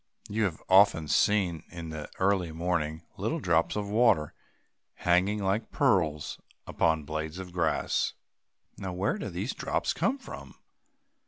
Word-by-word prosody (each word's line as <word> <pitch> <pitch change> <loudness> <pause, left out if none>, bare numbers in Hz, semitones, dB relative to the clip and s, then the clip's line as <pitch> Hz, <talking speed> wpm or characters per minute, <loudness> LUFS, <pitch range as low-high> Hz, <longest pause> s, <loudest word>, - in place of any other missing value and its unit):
You 110 +1 0
have 85 -5 -4
often 95 -4 +5
seen, 90 -3 +2
in 85 -2 -7
the 80 -1 -6
early 95 -3 +1
morning, 80 -1 -2
little - - -1
drops 85 -2 +2
of 105 -1 -2
water 100 -8 +3 0.6
hanging 95 +4 +2
like 100 +4 0
pearls 85 - +1 0.3
upon 80 -1 +1
the - - -13
blades 80 +2 -4
of 90 -2 -8
grass. 85 -3 0 0.7
Now, 95 -2 -4
where 100 - -1
do - - -4
these - - -3
drops - - -1
come 270 - 0
from? 270 - -10
90 Hz, 145 wpm, -29 LUFS, 80-100 Hz, 0.7 s, often